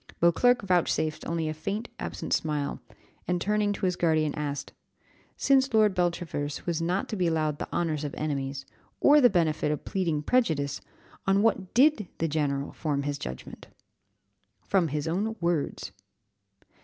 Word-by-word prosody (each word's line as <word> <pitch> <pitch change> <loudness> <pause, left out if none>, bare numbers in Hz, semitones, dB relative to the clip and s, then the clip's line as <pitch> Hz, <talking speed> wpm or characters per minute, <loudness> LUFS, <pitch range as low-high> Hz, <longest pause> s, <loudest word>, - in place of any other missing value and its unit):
Beauclerc 235 +8 +4
vouchsafed 165 -4 0
only 165 -1 -1
a 155 - -2
faint, 200 +9 -4
absent - - -4
smile, 150 -2 -1 0.5
and, 180 0 +1
turning 210 +2 +1
to 195 - -3
his 180 -1 +1
guardian, 155 -3 +1
asked 145 -2 -4 0.6
"Since 270 -3 +3
Lord 215 -2 +5
Beltravers 170 -5 -2
was 170 -2 -1
not 180 +4 0
to - - -2
be 180 -3 +1
allowed 155 -2 0
the - - -5
honours 155 -3 -1
of 145 - -4
enemies, 140 -2 -3 0.3
or 295 +1 +6
the 245 - +7
benefit 155 -5 +1
of 150 - -4
pleading 165 -6 -1
prejudice, 150 - +1 0.5
on 195 +1 +4
what 195 -5 0
did 255 - +4
the 165 - 0
general 145 -2 -1
form 145 -3 -2
his 145 0 -3
judgment?" 65 - -8 1.0
"From 190 -4 +2
his 150 +1 -3
own 205 +7 -1
words." 170 -4 -1
165 Hz, 155 wpm, -27 LUFS, 150-195 Hz, 1.0 s, the